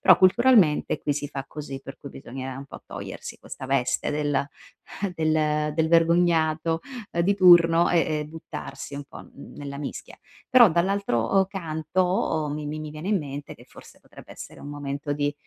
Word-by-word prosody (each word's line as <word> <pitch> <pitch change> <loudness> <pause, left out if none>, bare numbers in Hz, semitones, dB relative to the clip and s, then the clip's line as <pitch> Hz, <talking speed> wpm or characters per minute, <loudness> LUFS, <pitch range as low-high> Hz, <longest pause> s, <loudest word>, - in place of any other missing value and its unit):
però - - +6
culturalmente 190 -4 +4
qui 145 - 0
si 145 0 -4
fa 135 -2 -6
così. 140 -1 -7
Per 135 0 -10
cui 140 - -10
bisognerà 130 0 -7
un 140 - -7
po' - - -11
togliersi - - -8
questa 130 - -9
veste 135 -2 0
del 145 -2 0 0.7
del 155 -2 +1
del 160 0 +2
vergognato, 165 -1 +3 0.3
ehm, 170 - +1
di 200 +3 +2
turno 175 -2 +6
e 175 - +3 0.2
e - - -4
buttarsi 155 -2 -8
un 145 - -6
po' - - -11
n - - -16 0.2
nella 140 -1 -7
mischia. 145 - -7 0.3
Però 245 -4 +8
dall'altro 170 - 0
uhm, 190 -1 +4
canto 165 -2 -1
mi 150 0 -5
mi 155 +1 -4
mi 155 - -6
viene 155 +4 -8
in 205 -3 +3
mente 145 -1 -7
che - - -17
forse - - -16
potrebbe - - -14
essere - - -10
un 145 - -8
momento 145 0 -4
di, 145 0 -1
155 Hz, 180 wpm, -25 LUFS, 145-170 Hz, 0.7 s, Però